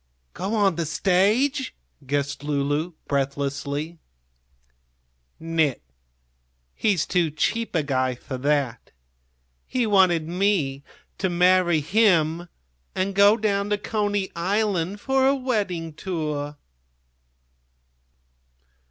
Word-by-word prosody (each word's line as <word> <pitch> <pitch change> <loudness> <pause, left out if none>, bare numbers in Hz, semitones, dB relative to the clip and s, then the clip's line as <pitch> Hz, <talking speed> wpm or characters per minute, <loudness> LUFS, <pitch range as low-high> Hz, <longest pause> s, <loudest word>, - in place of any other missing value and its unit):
"Go 195 +5 -3
on 195 -5 +2
the 165 -2 -1
stage?" 215 - +1 0.3
guessed 140 0 -2
Lulu, 145 +3 -1
breathlessly. 140 +3 -2 1.4
"Nit; 160 -4 0 0.9
he's 200 -7 +1
too 175 -3 +1
cheap 205 +9 -1
a 160 - +2
guy 130 -2 0
for 130 +1 -7
that. 140 -4 -1 0.8
He 250 -2 0
wanted 185 -6 +3
me 175 -7 0 0.4
to 190 - 0
marry 175 -2 +3
him 170 -2 +2 0.5
and 190 +1 -1
go 200 +2 +6
down 205 -2 0
to 210 - +1
Coney 205 -2 -1
Island 195 +1 0
for 265 +3 +2
a 275 - +4
wedding 200 - -2
tour!" 150 -4 -4
175 Hz, 100 wpm, -24 LUFS, 150-205 Hz, 1.4 s, go